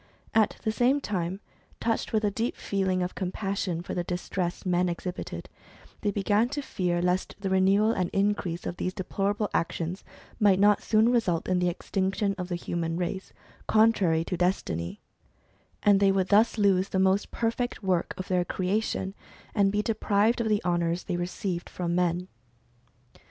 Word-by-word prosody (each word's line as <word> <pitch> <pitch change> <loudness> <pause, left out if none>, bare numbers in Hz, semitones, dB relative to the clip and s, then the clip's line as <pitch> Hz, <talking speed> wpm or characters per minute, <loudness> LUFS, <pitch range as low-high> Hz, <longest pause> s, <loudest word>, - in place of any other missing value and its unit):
At 220 -2 +3
the 220 - +1
same 250 +5 +3
time, 190 -5 -3 0.4
touched 225 -1 -1
with 220 -1 +1
a 205 - +2
deep 230 +4 -2
feeling 190 -2 0
of 180 - -3
compassion 190 -2 -2
for - - -5
the 175 - -1
distress 180 +1 -3
men 180 0 +2
exhibited, 180 +1 -5 0.5
they 205 - +1
began 205 +3 +2
to 285 +1 -3
fear 175 -7 -1
lest 180 +1 0
the 195 -1 -2
renewal 195 +3 +4
and 185 -6 -1
increase 195 -4 -1
of 175 - -4
these 185 - -3
deplorable 200 +3 -1
actions 170 +2 -2 0.4
might 200 -3 +4
not 205 0 +5
soon 220 +1 +3
result 195 -9 +1
in 185 -1 +2
the 180 0 +2
extinction 195 +3 -1
of 180 - -3
the 175 - -1
human 170 -1 -3
race, 185 +2 -3 0.4
contrary 200 -7 +4
to 180 - -3
destiny, 125 - -1 0.8
and 205 -1 +5
they 200 -1 +5
would 190 -1 0
thus 215 +3 +4
lose 195 -2 +3
the - - -1
most 190 +1 +2
perfect 235 0 -2
work 185 -3 0
of 185 - -5
their 180 -1 +2
creation, 190 +1 -1 0.4
and 200 -2 +3
be 210 +1 0
deprived 220 +1 +2
of 220 - 0
the 210 -1 +1
honours 170 0 0
they 180 - -3
received 175 0 -3
from 170 -1 -3
men. 180 0 0
190 Hz, 165 wpm, -27 LUFS, 180-210 Hz, 0.8 s, not